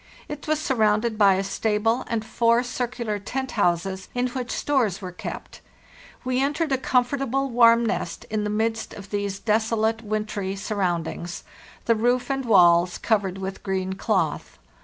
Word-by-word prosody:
It 295 Hz, 0 st, -7 dB
was 310 Hz, 0 st, +1 dB
surrounded 220 Hz, -6 st, +1 dB
by 200 Hz, -3 st, +5 dB
a 190 Hz, -, 0 dB
stable 220 Hz, +3 st, 0 dB
and 225 Hz, -2 st, -2 dB
four 235 Hz, +1 st, +2 dB
circular 240 Hz, -3 st, -3 dB
tent 260 Hz, +5 st, -4 dB
houses, 190 Hz, -1 st, 0 dB
in 250 Hz, +1 st, 0 dB
which 250 Hz, 0 st, -5 dB
stores 240 Hz, -10 st, 0 dB
were 185 Hz, -3 st, -6 dB
kept. 180 Hz, -, -8 dB, 0.6 s
We 255 Hz, 0 st, +1 dB
entered 295 Hz, +2 st, 0 dB
a 265 Hz, -, +2 dB
comfortable, 270 Hz, +1 st, 0 dB
warm 235 Hz, 0 st, +5 dB
nest 225 Hz, -, -3 dB
in 215 Hz, -1 st, 0 dB
the 210 Hz, -, -2 dB
midst 225 Hz, +1 st, -1 dB
of 195 Hz, -1 st, -11 dB
these 200 Hz, -1 st, -2 dB
desolate, 220 Hz, +1 st, +1 dB
wintry 210 Hz, -3 st, -3 dB
surroundings, 175 Hz, -4 st, -3 dB, 0.4 s
the 230 Hz, -, +4 dB
roof 245 Hz, +4 st, +1 dB
and 270 Hz, -1 st, -2 dB
walls 175 Hz, -4 st, +5 dB
covered 200 Hz, -4 st, 0 dB
with 190 Hz, 0 st, -5 dB
green 190 Hz, -1 st, -2 dB
cloth. 190 Hz, -, -1 dB
220 Hz, 155 wpm, -24 LUFS, 195-245 Hz, 0.6 s, by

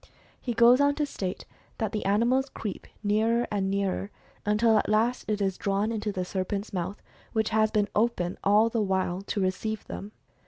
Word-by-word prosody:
He 240 Hz, -3 st, -3 dB
goes 240 Hz, +3 st, +6 dB
on 285 Hz, 0 st, +3 dB
to 300 Hz, -, 0 dB
state 190 Hz, -9 st, -5 dB, 0.3 s
that 220 Hz, -, -1 dB
the 215 Hz, -, -3 dB
animal 235 Hz, +6 st, +3 dB
creeps 205 Hz, -4 st, -5 dB
nearer 225 Hz, +3 st, +2 dB
and 195 Hz, -2 st, 0 dB
nearer, 195 Hz, 0 st, -1 dB, 0.4 s
until 215 Hz, +1 st, +4 dB
at -, -, -2 dB
last 225 Hz, +4 st, +1 dB
it 210 Hz, -1 st, 0 dB
is 190 Hz, -1 st, -1 dB
drawn 200 Hz, +2 st, 0 dB
into 215 Hz, -2 st, -2 dB
the 185 Hz, -2 st, -3 dB
serpent's 195 Hz, +3 st, -3 dB
mouth, 185 Hz, +2 st, -3 dB, 0.3 s
which 220 Hz, -1 st, +1 dB
has 220 Hz, 0 st, +3 dB
been 210 Hz, -1 st, +1 dB
open 210 Hz, -5 st, 0 dB
all 210 Hz, +3 st, +5 dB
the 230 Hz, -1 st, 0 dB
while 190 Hz, -2 st, 0 dB
to 200 Hz, +1 st, -3 dB
receive 200 Hz, +3 st, -2 dB
them. 205 Hz, -, -7 dB
210 Hz, 185 wpm, -27 LUFS, 195-225 Hz, 0.4 s, goes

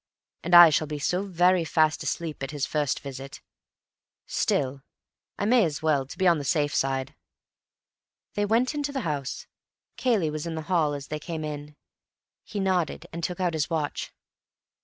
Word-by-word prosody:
And 175 Hz, +1 st, +2 dB
I 175 Hz, -2 st, +11 dB
shall 155 Hz, +1 st, +1 dB
be 150 Hz, 0 st, -4 dB
so 180 Hz, +6 st, 0 dB
very 180 Hz, -1 st, +3 dB
fast 155 Hz, -1 st, +2 dB
asleep 160 Hz, -4 st, -3 dB
at 135 Hz, -, -3 dB
his 145 Hz, -2 st, -2 dB
first 150 Hz, -3 st, -1 dB
visit. 135 Hz, 0 st, -8 dB, 0.9 s
Still, 135 Hz, 0 st, 0 dB, 0.6 s
I -, -, -1 dB
may 235 Hz, +1 st, +5 dB
as 155 Hz, -3 st, -2 dB
well—to 140 Hz, -4 st, 0 dB
be 190 Hz, -, 0 dB
on 170 Hz, -3 st, +4 dB
the -, -, -4 dB
safe 145 Hz, +1 st, +1 dB
side." 135 Hz, -1 st, -1 dB, 1.2 s
They 205 Hz, -, 0 dB
went 235 Hz, +6 st, +2 dB
into 290 Hz, -1 st, -2 dB
the 270 Hz, -2 st, -2 dB
house. 145 Hz, -, -3 dB, 0.5 s
Cayley 215 Hz, -12 st, +1 dB
was 155 Hz, +2 st, -4 dB
in 165 Hz, -, -4 dB
the 160 Hz, -, -4 dB
hall 155 Hz, -4 st, +2 dB
as 140 Hz, -1 st, -8 dB
they 150 Hz, -, -3 dB
came 160 Hz, 0 st, -5 dB
in. 150 Hz, -1 st, -6 dB, 0.7 s
He 210 Hz, -, -5 dB
nodded, 185 Hz, -5 st, 0 dB
and 170 Hz, +1 st, -5 dB
took 180 Hz, +2 st, -3 dB
out 180 Hz, -2 st, 0 dB
his 155 Hz, -2 st, -1 dB
watch. 155 Hz, -3 st, -2 dB
155 Hz, 175 wpm, -26 LUFS, 145-180 Hz, 1.2 s, I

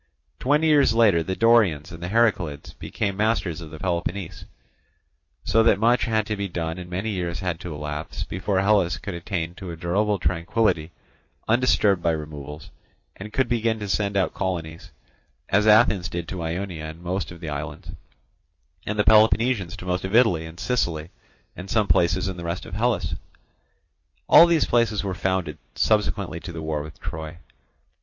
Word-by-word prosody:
Twenty 150 Hz, +4 st, +2 dB
years 145 Hz, -7 st, +4 dB
later, 105 Hz, -8 st, +4 dB
the 95 Hz, +3 st, -3 dB
Dorians 100 Hz, -10 st, +3 dB
and 80 Hz, -, -10 dB
the 85 Hz, -, -4 dB
Heraclids 95 Hz, -10 st, 0 dB
became 100 Hz, -3 st, -3 dB
masters 100 Hz, -6 st, 0 dB
of 80 Hz, -, -9 dB
Peloponnese; 85 Hz, +1 st, -3 dB, 1.0 s
so 115 Hz, -, +3 dB
that 115 Hz, -, +4 dB
much 120 Hz, +4 st, +3 dB
had 110 Hz, -2 st, 0 dB
to 105 Hz, -, -2 dB
be 100 Hz, -1 st, -3 dB
done 85 Hz, -1 st, -4 dB
and 90 Hz, -1 st, -8 dB
many 95 Hz, +5 st, -3 dB
years 90 Hz, -3 st, -3 dB
had 90 Hz, -3 st, -2 dB
to 90 Hz, -, -7 dB
elapse 75 Hz, +1 st, -5 dB
before 95 Hz, +1 st, -1 dB
Hellas 100 Hz, -4 st, +2 dB
could 100 Hz, -, -6 dB
attain 85 Hz, -1 st, -4 dB
to 95 Hz, 0 st, -9 dB
a 85 Hz, -, -5 dB
durable 100 Hz, +5 st, 0 dB
tranquillity 85 Hz, -1 st, 0 dB, 0.6 s
undisturbed 110 Hz, -5 st, +3 dB
by 85 Hz, -1 st, +1 dB
removals, 75 Hz, -1 st, -7 dB, 0.4 s
and 105 Hz, +2 st, -9 dB
could 130 Hz, +1 st, +1 dB
begin 115 Hz, -2 st, 0 dB
to 105 Hz, -1 st, -5 dB
send 100 Hz, 0 st, 0 dB
out 95 Hz, -, +1 dB
colonies, 85 Hz, -3 st, -4 dB, 0.6 s
as 105 Hz, +2 st, +3 dB
Athens 105 Hz, -5 st, +5 dB
did 85 Hz, -1 st, -5 dB
to 90 Hz, -2 st, -5 dB
Ionia 85 Hz, 0 st, -4 dB
and 80 Hz, +2 st, -9 dB
most 95 Hz, +3 st, -2 dB
of 85 Hz, -, -11 dB
the 80 Hz, -2 st, -6 dB
islands, 75 Hz, +1 st, -6 dB, 1.0 s
and 105 Hz, -, -2 dB
the 105 Hz, -, +3 dB
Peloponnesians 110 Hz, -3 st, +3 dB
to 90 Hz, -, -9 dB
most 90 Hz, 0 st, -1 dB
of 95 Hz, +3 st, -2 dB
Italy 90 Hz, -10 st, +4 dB
and 80 Hz, +1 st, -12 dB
Sicily 85 Hz, -10 st, -1 dB, 0.4 s
and 90 Hz, +2 st, -9 dB
some 110 Hz, 0 st, +2 dB
places 90 Hz, +2 st, +2 dB
in 95 Hz, -1 st, -4 dB
the 85 Hz, -, -7 dB
rest 85 Hz, +2 st, -4 dB
of -, -, -11 dB
Hellas. 115 Hz, +2 st, 0 dB, 1.1 s
All 170 Hz, -, +8 dB
these 170 Hz, -2 st, +3 dB
places 115 Hz, -4 st, +1 dB
were 95 Hz, -2 st, -2 dB
founded 90 Hz, -5 st, -2 dB, 0.2 s
subsequently 100 Hz, -6 st, 0 dB
to 85 Hz, -, -8 dB
the 80 Hz, -1 st, -7 dB
war 80 Hz, -1 st, -2 dB
with 75 Hz, +1 st, -10 dB
Troy. 80 Hz, -2 st, -6 dB
95 Hz, 175 wpm, -24 LUFS, 85-105 Hz, 1.1 s, All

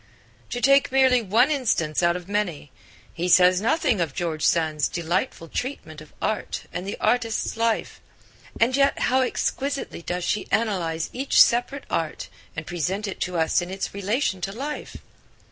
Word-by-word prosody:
To 245 Hz, -, -3 dB
take 275 Hz, +2 st, +4 dB
merely 260 Hz, -2 st, +4 dB
one 225 Hz, +8 st, +3 dB
instance 210 Hz, -, 0 dB
out 170 Hz, 0 st, +3 dB
of 180 Hz, 0 st, -7 dB
many, 190 Hz, -9 st, -2 dB, 0.4 s
he 175 Hz, +2 st, -2 dB
says 180 Hz, +1 st, +6 dB
nothing 230 Hz, -, +1 dB
of 155 Hz, -5 st, -2 dB
George 165 Hz, -3 st, -2 dB
Sand's 155 Hz, -3 st, +2 dB
delightful 170 Hz, +2 st, -2 dB
treatment 160 Hz, -, -5 dB
of 155 Hz, -, -14 dB
art 215 Hz, -, -2 dB
and 180 Hz, +2 st, -4 dB
the 200 Hz, -, -4 dB
artist's 230 Hz, -2 st, 0 dB
life. 230 Hz, 0 st, -1 dB, 0.6 s
And 240 Hz, +3 st, +3 dB
yet 275 Hz, 0 st, +3 dB
how 260 Hz, +1 st, +2 dB
exquisitely 275 Hz, -3 st, -2 dB
does 180 Hz, +1 st, -3 dB
she 210 Hz, -, -1 dB
analyse 175 Hz, -8 st, 0 dB
each 265 Hz, +2 st, +1 dB
separate 245 Hz, +4 st, +4 dB
art 165 Hz, -2 st, -3 dB, 0.3 s
and 155 Hz, -, -5 dB
present 185 Hz, +5 st, -2 dB
it 195 Hz, -, -7 dB
to 180 Hz, -1 st, -2 dB
us 160 Hz, +2 st, +2 dB
in 175 Hz, -, -6 dB
its 190 Hz, +1 st, -4 dB
relation 200 Hz, 0 st, -1 dB
to 195 Hz, -, -3 dB
life! 280 Hz, +8 st, -6 dB
195 Hz, 160 wpm, -24 LUFS, 170-250 Hz, 0.6 s, says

